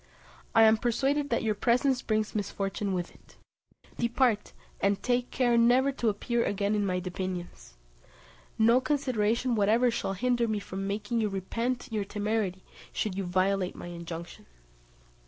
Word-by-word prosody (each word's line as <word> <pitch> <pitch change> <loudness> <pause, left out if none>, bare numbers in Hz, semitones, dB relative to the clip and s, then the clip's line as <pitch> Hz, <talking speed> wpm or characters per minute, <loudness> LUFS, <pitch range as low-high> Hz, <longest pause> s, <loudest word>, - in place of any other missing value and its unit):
I 225 - +8
am 220 0 +6
persuaded 275 +5 0
that 230 - 0
your 220 -1 +1
presence 250 +5 +2
brings 215 -1 -1
misfortune 200 -1 -2
with 175 -1 -4
it. - - -21 0.6
Depart, 235 -2 +1 0.3
and 200 0 +1
take 245 0 +1
care 240 -2 +2
never 250 +4 +4
to 240 -4 0
appear 235 +3 0
again 205 +1 0
in 210 -1 +1
my 180 -1 0
dominions. 180 - -6 0.8
No 230 +3 +5
consideration 255 -4 0
whatever 225 +3 +3
shall 210 -4 -2
hinder 240 +3 +1
me 215 -1 0
from 195 -1 -5
making 220 +3 -1
you 215 - +1
repent 230 +6 -2
your 215 -2 -1
temerity 205 -2 -2 0.3
should 215 - -2
you 195 -1 -2
violate 185 +1 0
my - - -8
injunction." 170 0 -8
215 Hz, 150 wpm, -29 LUFS, 195-240 Hz, 0.8 s, I